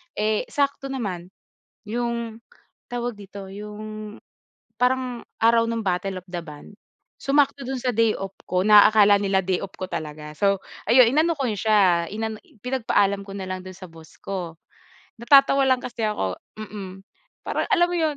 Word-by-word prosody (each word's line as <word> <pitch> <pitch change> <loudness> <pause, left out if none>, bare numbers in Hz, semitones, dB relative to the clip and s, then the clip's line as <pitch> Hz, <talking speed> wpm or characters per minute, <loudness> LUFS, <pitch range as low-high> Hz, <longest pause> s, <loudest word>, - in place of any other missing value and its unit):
eh, 215 0 0
sakto 280 -1 -1
naman. 200 -10 -4 0.6
Yung 235 0 -3 0.5
tawag 245 -1 -3
dito 200 -1 -9
yung, 210 +1 -8 0.7
parang 250 -1 +1 0.2
araw 230 0 +3
ng 230 -2 -3
Battle 185 +1 -1
of 185 - -9
the 175 -2 -5
Band 150 +2 -12 0.4
sumakto 280 0 +1
dun 265 0 -3
sa 250 -2 -1
day 225 0 +4
off 195 -2 -6
ko 180 - -1
na 210 0 +8
akala 205 -1 +6
nila 195 -1 +1
day 185 0 -1
off 195 - -6
ko 185 - -3
talaga. 155 -3 -6
So 195 +3 +2 0.3
ayun 240 +3 +7
inano 320 +2 +3
ko 275 -5 -2
siya 200 -5 +3 0.5
pinagpaalam 205 -5 +1
ko 195 - -11
na 195 -1 -6
lang 185 0 -5
dun 185 - -8
sa 185 0 -11
boss 160 -2 -16
ko. 175 -4 -5 0.6
Natatawa 275 +2 +5
lang 260 -1 +2
kasi 240 -1 -7
ako 95 - -1 0.2
mm, 195 -3 -8 0.4
parang - - -2
alam 370 -6 +4
mo - - -1
yun. 315 -4 0
210 Hz, 160 wpm, -24 LUFS, 190-245 Hz, 0.7 s, na